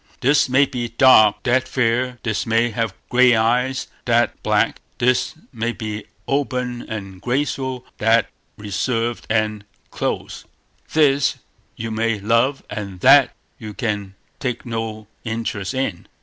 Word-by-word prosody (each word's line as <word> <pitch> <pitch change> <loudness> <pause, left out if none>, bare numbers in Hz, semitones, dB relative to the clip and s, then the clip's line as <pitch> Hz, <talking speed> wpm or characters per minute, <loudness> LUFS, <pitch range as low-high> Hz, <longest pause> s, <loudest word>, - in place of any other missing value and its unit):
This 135 +1 +3
may 135 +2 +5
be 120 -3 -4
dark, 115 -3 +5
that 130 +1 +2
fair; 125 0 0
this 110 -1 -2
may 115 +1 +2
have 115 -2 -2
gray 125 -1 +5
eyes, 125 +4 +1 0.2
that 120 -1 +1
black; - - +1 0.2
this 125 +1 +1 0.2
may 115 0 -2
be 110 -2 -5 0.2
open 125 -3 -1
and 95 -4 -7
graceful, 130 0 -2
that 110 +1 +3 0.3
reserved 115 +3 -2
and 110 -2 0 0.3
close; - - -4 0.5
this 140 -3 +3 0.4
you 115 0 -5
may 110 -1 0
love, 115 +7 +1
that 100 -3 +4 0.2
you 105 -2 -8
can 105 -5 -3 0.2
take 125 -3 -3
no 115 -2 -4 0.2
interest 110 -3 -3
in. 130 -10 -3
115 Hz, 125 wpm, -21 LUFS, 110-125 Hz, 0.5 s, may